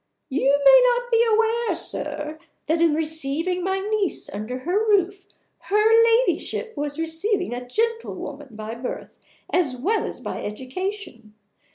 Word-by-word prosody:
You 280 +1 +2
may - - +9
not 485 0 -1
be 460 0 +5
aware, 455 +1 +2
sir, 305 +1 -4 0.3
that 325 +2 +1
in 330 -3 +4
receiving 320 +3 -2
my 380 +1 0
niece 410 -1 -1
under 215 +5 -5
her 365 +9 0
roof 390 -1 +1 0.3
her 440 +3 +4
Ladyship 460 0 +1
was 290 0 -3
receiving 325 - -1
a 245 0 -6
gentlewoman 295 - -3
by 215 +1 -6
birth 240 +2 -7 0.3
as 280 -8 +1
well 410 - 0
as - - -6
by - - -5
education. 255 - -6
350 Hz, 140 wpm, -23 LUFS, 280-430 Hz, 0.3 s, may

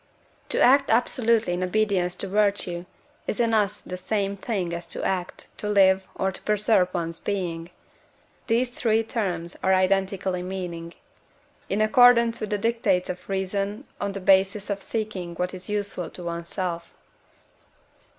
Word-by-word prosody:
To - - 0
act 275 +2 +5
absolutely 230 -3 +2
in 175 - -2
obedience 185 -2 +1
to 195 - -2
virtue 200 -3 0 0.4
is - - -2
in 230 -1 +2
us 210 -1 +1
the 180 - -6
same 200 +1 -1
thing 195 -4 -3
as 170 0 -5
to - - -5
act, 185 -2 -3
to 210 - -3
live, 190 -2 +4
or 190 0 0
to - - -8
preserve 210 -3 +2
one's 165 -2 -3
being 175 -4 -3 0.8
(these 240 +1 +1
three 225 -2 +1
terms 185 -7 -2
are 190 0 +3
identical 190 0 +1
in 180 0 -3
meaning) 175 -3 -5 0.7
in 200 +2 0
accordance 235 +1 +5
with 215 - -3
the 210 - 0
dictates 205 -5 +1
of 180 +1 -11
reason 195 +4 -2 0.2
on 200 -1 -2
the 195 - -3
basis 195 +2 +3
of 200 -1 -3
seeking 195 -6 -4
what 180 +2 -2
is 185 +1 -7
useful 205 -4 -2
to 180 - -9
one's 170 0 -5
self. 175 -3 -4
195 Hz, 160 wpm, -25 LUFS, 180-215 Hz, 0.8 s, act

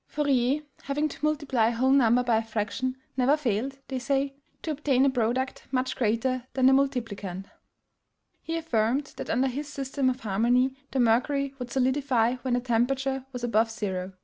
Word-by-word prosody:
Fourier, 280 -1 +1 0.2
having 295 +2 -1
to - - -11
multiply 290 -7 +1
a 235 - 0
whole 260 +3 +2
number 250 -2 +4
by 235 -2 +2
a - - +1
fraction, 225 +4 -3 0.2
never 265 +3 +3
failed, 265 0 -1
they 260 -1 -3
say, 275 +2 0 0.3
to 320 - -2
obtain 275 -3 +2
a 275 - +3
product 250 +1 -1
much 260 -1 0
greater 240 +2 0
than 260 -1 +3
the 265 - +7
multiplicand. 225 -9 -1 1.0
He 330 0 -3
affirmed 265 -2 0
that - - -6
under 255 +3 +2
his 280 +3 -4
system 275 -2 -1
of 255 +1 -3
harmony 240 +5 +2 0.2
the 270 - -2
mercury 265 +4 +2
would 250 -1 -5
solidify 255 -2 +1
when 250 -1 -1
the 245 - 0
temperature 265 +2 0
was 250 -2 -6
above 225 -1 +2
zero. 190 -4 -4
255 Hz, 175 wpm, -27 LUFS, 230-275 Hz, 1.0 s, the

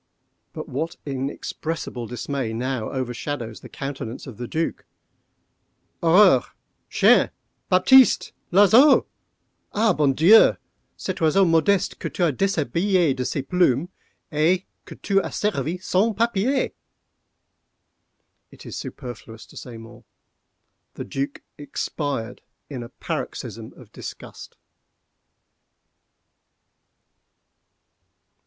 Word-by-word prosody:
But - - -7
what 160 +6 -4
inexpressible 135 -1 -4
dismay 125 -1 -4
now 125 -1 -3
overshadows 125 -2 -4
the - - -13
countenance 135 -4 -6
of 125 -6 -10
the 120 - -6
Duc?—"_Horreur!—chien! 165 - 0 0.4
Baptiste!—l'oiseau! 220 +3 +5 0.7
ah, 215 -1 +3
bon 145 -4 +2
Dieu! 180 +11 +6 0.4
cet 190 -2 -5
oiseau 165 +5 +4
modeste 170 +3 +2
que - - -4
tu 180 - -2
as 160 -4 +2
déshabillé 175 - +1
de 130 - -2
ses 135 +2 -3
plumes, 175 -1 +1 0.4
et 165 +5 +2 0.2
que - - -10
tu 195 -1 +2
as - - -6
servi 185 -5 -1
sans 195 +4 0
papier!_" 235 +4 +1 1.8
It - - -15
is - - -7
superfluous 120 -3 -8
to - - -19
say 120 -3 -9
more:—the 115 +1 -15
Duc 140 +1 -4 0.2
expired 145 -4 -4 0.3
in 130 -3 -5
a 120 - -8
paroxysm - - -6
of - - -16
disgust. - - -10
155 Hz, 95 wpm, -23 LUFS, 130-185 Hz, 1.8 s, Dieu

